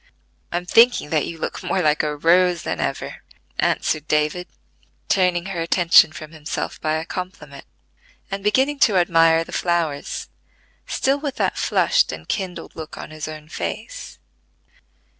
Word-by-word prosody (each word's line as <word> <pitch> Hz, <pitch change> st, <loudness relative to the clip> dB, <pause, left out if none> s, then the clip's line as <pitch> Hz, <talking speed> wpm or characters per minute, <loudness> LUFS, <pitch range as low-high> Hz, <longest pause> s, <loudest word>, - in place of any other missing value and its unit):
"I 175 Hz, -, 0 dB
am 180 Hz, -, -4 dB
thinking 230 Hz, -4 st, +4 dB
that 155 Hz, -2 st, +1 dB
you 165 Hz, -, -6 dB
look -, -, -4 dB
more 185 Hz, -, -1 dB
like 150 Hz, 0 st, +3 dB
a 150 Hz, -1 st, -2 dB
rose 175 Hz, +2 st, +3 dB
than -, -, -3 dB
ever," -, -, -3 dB, 0.4 s
answered 155 Hz, -1 st, 0 dB
David 150 Hz, +4 st, 0 dB, 0.6 s
turning 180 Hz, -2 st, +2 dB
her 190 Hz, -3 st, -3 dB
attention 165 Hz, -1 st, +5 dB
from 155 Hz, 0 st, -9 dB
himself 155 Hz, -2 st, -5 dB
by 155 Hz, 0 st, 0 dB
a 160 Hz, +1 st, -3 dB
compliment, 185 Hz, +2 st, -7 dB, 0.7 s
and 195 Hz, 0 st, -4 dB
beginning 265 Hz, +7 st, +2 dB
to 210 Hz, -8 st, +4 dB
admire 165 Hz, -2 st, +4 dB
the -, -, -13 dB
flowers, 170 Hz, -5 st, -1 dB, 0.6 s
still 275 Hz, +2 st, +1 dB
with 285 Hz, -2 st, -4 dB
that -, -, 0 dB
flushed -, -, +2 dB
and -, -, -9 dB
kindled 190 Hz, -4 st, -4 dB
look 160 Hz, -1 st, -8 dB
on -, -, -8 dB
his 155 Hz, 0 st, -6 dB
own 155 Hz, -1 st, -8 dB
face. 85 Hz, -, -6 dB
170 Hz, 155 wpm, -22 LUFS, 155-185 Hz, 0.7 s, attention